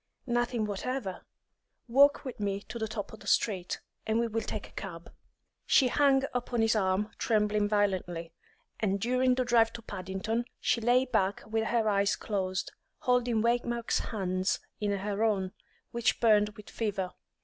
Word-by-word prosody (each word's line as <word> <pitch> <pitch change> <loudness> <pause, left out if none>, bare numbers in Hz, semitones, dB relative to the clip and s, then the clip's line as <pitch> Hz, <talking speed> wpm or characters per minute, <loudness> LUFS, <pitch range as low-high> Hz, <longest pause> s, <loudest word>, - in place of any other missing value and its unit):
"Nothing 240 -2 0
whatever. 210 0 -3 0.7
Walk 280 +5 +5
with 255 - -6
me 200 -1 -1
to 235 - -8
the 220 - -1
top 215 -1 -5
of 220 - -10
the - - -12
street, 185 -5 +1 0.3
and 220 +1 +2
we 235 - +1
will 225 0 -1
take 215 - -5
a - - -19
cab." 170 -4 -8 0.5
She 260 -4 +5
hung 275 0 +4
upon 245 -1 -1
his 225 0 +3
arm, 195 +1 +1
trembling 210 -1 +2
violently; 185 -5 0 0.5
and 200 -2 +1
during 255 +3 +2
the 255 0 0
drive 230 -1 +4
to 235 - -8
Paddington, 200 +4 -3
she 235 - +1
lay 245 +3 +4
back 195 -6 0
with 220 +1 -1
her 230 -1 +1
eyes 200 -1 +2
closed, 190 -3 -2 0.3
holding 245 -3 +2
Waymark's 235 0 +1
hands 185 -2 0 0.2
in 205 -1 0
her 200 +2 -1
own, 195 -4 +1 0.4
which 235 -1 +1
burned 210 -1 +4
with 210 - -11
fever. 200 -5 -2
220 Hz, 160 wpm, -30 LUFS, 200-235 Hz, 0.7 s, Walk